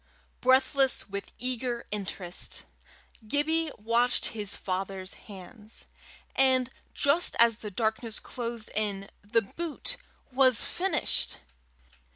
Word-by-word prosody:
Breathless 265 Hz, +1 st, +4 dB
with 200 Hz, 0 st, -6 dB
eager 245 Hz, -1 st, -2 dB
interest, 190 Hz, -3 st, -4 dB, 0.6 s
Gibbie 315 Hz, +5 st, +1 dB
watched 235 Hz, +3 st, +4 dB
his 210 Hz, -3 st, -2 dB
father's 190 Hz, 0 st, -3 dB, 0.2 s
hands, 210 Hz, +3 st, -8 dB, 0.5 s
and 260 Hz, -1 st, +3 dB, 0.2 s
just 295 Hz, +5 st, +3 dB
as 230 Hz, -2 st, +6 dB
the 215 Hz, -, -6 dB
darkness 220 Hz, +2 st, -1 dB
closed 235 Hz, -2 st, -4 dB
in, 200 Hz, -2 st, -2 dB
the 210 Hz, +3 st, +1 dB
boot 335 Hz, -, -3 dB, 0.3 s
was 255 Hz, -2 st, +5 dB
finished. 65 Hz, -, 0 dB
230 Hz, 100 wpm, -29 LUFS, 200-260 Hz, 0.6 s, as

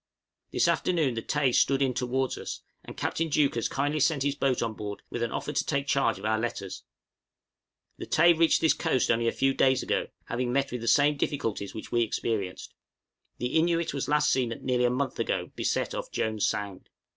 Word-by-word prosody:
This -, -, +2 dB
afternoon 160 Hz, -8 st, +1 dB
the 115 Hz, -, -3 dB
'Tay' 140 Hz, +1 st, +1 dB
stood 135 Hz, +2 st, +3 dB
in 135 Hz, -2 st, +1 dB
towards 130 Hz, +1 st, -1 dB
us, -, -, -6 dB, 0.2 s
and -, -, -10 dB
Captain 165 Hz, 0 st, -1 dB
Deuchars 140 Hz, -6 st, +1 dB
kindly 145 Hz, +3 st, -1 dB
sent 150 Hz, -1 st, +2 dB
his 140 Hz, 0 st, +1 dB
boat 135 Hz, -4 st, 0 dB
on 115 Hz, -1 st, -2 dB
board 105 Hz, -1 st, -7 dB
with 120 Hz, -, -4 dB
an 120 Hz, -, -1 dB
offer 150 Hz, -, -3 dB
to -, -, +1 dB
take 140 Hz, -2 st, -1 dB
charge 125 Hz, -6 st, +1 dB
of 95 Hz, -, -8 dB
our 110 Hz, 0 st, +1 dB
letters. 100 Hz, -5 st, -4 dB, 1.2 s
The -, -, -6 dB
'Tay' 175 Hz, -, +5 dB
reached 165 Hz, 0 st, +3 dB
this 160 Hz, -, +4 dB
coast 130 Hz, -, +1 dB
only 115 Hz, 0 st, +1 dB
a -, -, +3 dB
few 135 Hz, 0 st, +1 dB
days 130 Hz, -1 st, +3 dB
ago, -, -, -1 dB, 0.2 s
having 120 Hz, +1 st, -2 dB
met 135 Hz, +1 st, 0 dB
with 125 Hz, -1 st, -4 dB
the 115 Hz, -, -5 dB
same 145 Hz, +5 st, +4 dB
difficulties 115 Hz, -9 st, -2 dB
which 110 Hz, -, -8 dB
we 120 Hz, -, +2 dB
experienced. 105 Hz, -4 st, -2 dB, 0.6 s
The 125 Hz, +1 st, -3 dB
'Innuit' 165 Hz, 0 st, +2 dB
was 140 Hz, -, -3 dB
last 150 Hz, 0 st, +3 dB
seen 125 Hz, -3 st, +1 dB
nearly 125 Hz, -1 st, +1 dB
a -, -, +4 dB
month 130 Hz, +1 st, -2 dB
ago -, -, -1 dB
beset -, -, -1 dB
off -, -, -5 dB
Jones' 110 Hz, -2 st, 0 dB
Sound. 100 Hz, -2 st, -4 dB
130 Hz, 205 wpm, -28 LUFS, 115-145 Hz, 1.2 s, Tay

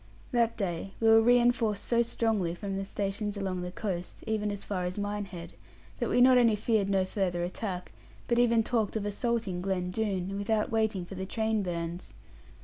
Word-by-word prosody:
That 235 Hz, -2 st, +2 dB
day 195 Hz, -1 st, -3 dB
we 225 Hz, -, +2 dB
were 225 Hz, 0 st, +8 dB
reinforced 240 Hz, -3 st, +3 dB
so 235 Hz, -1 st, +3 dB
strongly 220 Hz, -7 st, 0 dB
from 195 Hz, +1 st, -4 dB
the 195 Hz, 0 st, -3 dB
stations 205 Hz, +1 st, -3 dB
along 190 Hz, -2 st, -2 dB
the 180 Hz, -, -4 dB
coast, 180 Hz, -3 st, -4 dB
even 215 Hz, -1 st, -1 dB
as 205 Hz, -1 st, -5 dB
far 185 Hz, -3 st, -2 dB
as 180 Hz, +2 st, -4 dB
Minehead, 200 Hz, -4 st, -4 dB, 0.5 s
that -, -, 0 dB
we 245 Hz, -, +3 dB
not 255 Hz, 0 st, +7 dB
only 230 Hz, -3 st, +4 dB
feared 210 Hz, -1 st, +1 dB
no 190 Hz, -1 st, +2 dB
further 185 Hz, -3 st, -1 dB
attack, 180 Hz, 0 st, -4 dB, 0.4 s
but 235 Hz, 0 st, +2 dB
even 235 Hz, -2 st, +4 dB
talked 225 Hz, -3 st, 0 dB
of 210 Hz, -2 st, -1 dB
assaulting 205 Hz, -3 st, -1 dB
Glen 180 Hz, -1 st, -1 dB
Doone, 195 Hz, -2 st, -2 dB
without 215 Hz, +2 st, 0 dB
waiting 220 Hz, -5 st, 0 dB
for 185 Hz, -, -10 dB
the 190 Hz, 0 st, -5 dB
train 220 Hz, 0 st, 0 dB
bands. 170 Hz, -1 st, -4 dB
205 Hz, 185 wpm, -29 LUFS, 185-225 Hz, 0.5 s, were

